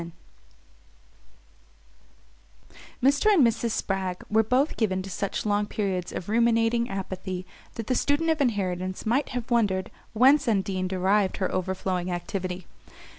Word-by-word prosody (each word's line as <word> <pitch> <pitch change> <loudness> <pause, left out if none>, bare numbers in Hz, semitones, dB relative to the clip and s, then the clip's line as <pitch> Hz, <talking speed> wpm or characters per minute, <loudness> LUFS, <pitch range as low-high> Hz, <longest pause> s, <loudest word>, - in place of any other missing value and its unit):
X 170 - -7 2.9
Mr. 285 +10 +4
and 335 -11 +6
Mrs. 230 0 +1
Spragg 190 -4 -2
were 220 +1 +5
both 255 +7 +1
given 190 -4 0
to 195 - -8
such 200 +3 -3
long 205 0 +1
periods 190 -5 -2
of 175 - -6
ruminating 230 +1 +2
apathy 185 -2 -5 0.3
that 230 - -5
the 255 - 0
student 290 +6 +1
of 310 -2 0
inheritance 185 -6 -1
might 250 +6 +1
have 245 -1 -5
wondered 200 -6 +1 0.2
whence 270 +5 +5
Undine 195 -3 0
derived 190 +1 +1
her 190 - -1
overflowing 185 -1 -2
activity. 180 0 -4
205 Hz, 130 wpm, -26 LUFS, 185-235 Hz, 2.9 s, and